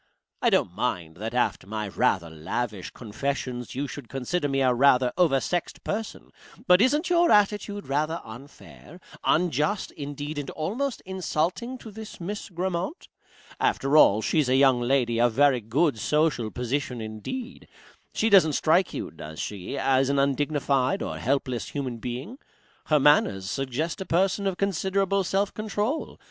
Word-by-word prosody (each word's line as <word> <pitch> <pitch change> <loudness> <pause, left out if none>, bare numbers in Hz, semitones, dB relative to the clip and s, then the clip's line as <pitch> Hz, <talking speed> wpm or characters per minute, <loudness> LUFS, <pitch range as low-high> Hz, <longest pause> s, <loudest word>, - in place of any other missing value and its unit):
I - - +4
don't - - +1
mind 80 -2 -3
that 110 +4 -5
after 120 -6 0
my 105 0 -3
rather 90 -3 0
lavish 95 +6 -4
confessions 125 +2 -4
you 140 +2 -2
should 135 -3 -9
consider 145 +4 -2
me 135 0 0
a 130 -1 +4
rather 125 -1 +4
oversexed 170 0 0
person, 215 +1 -5 0.3
but 180 +1 +6
isn't 295 +8 +2
your 345 0 +4
attitude 205 0 +2
rather 155 +4 -1
unfair, 140 +7 -13 0.2
unjust, 175 +4 +1
indeed, 145 +1 -5
and 140 - -5
almost 230 - -3
insulting, 190 +6 -2
to 225 -3 -11
this 220 +1 -9
Miss 205 +5 -5
Grammont? 180 - -3 0.5
After 135 +2 +1
all, 110 -8 +6
she's 150 -5 +1
a 130 - +3
young 135 -2 +5
lady 120 -2 +1
of 120 -1 +3
very 135 -1 +4
good 125 +4 +1
social 150 -5 +1
position 125 +1 -3
indeed. 110 - -6 0.4
She 220 - 0
doesn't 175 -6 +6
strike 170 +6 +2
you - - -4
does 80 +2 -9
she? 100 -3 -5
as 135 0 +2
an 140 - +1
undignified 140 -1 +1
or - - -5
helpless 130 -2 -1
human 130 -5 -4
being. 125 - -6 0.5
Her 155 -1 +4
manners 120 -10 +3
suggest 135 - -3
a - - -4
person 195 +3 +1
of 190 -2 -2
considerable 195 0 0
self 195 +2 0
control. 215 +7 -3
145 Hz, 150 wpm, -26 LUFS, 125-190 Hz, 0.5 s, but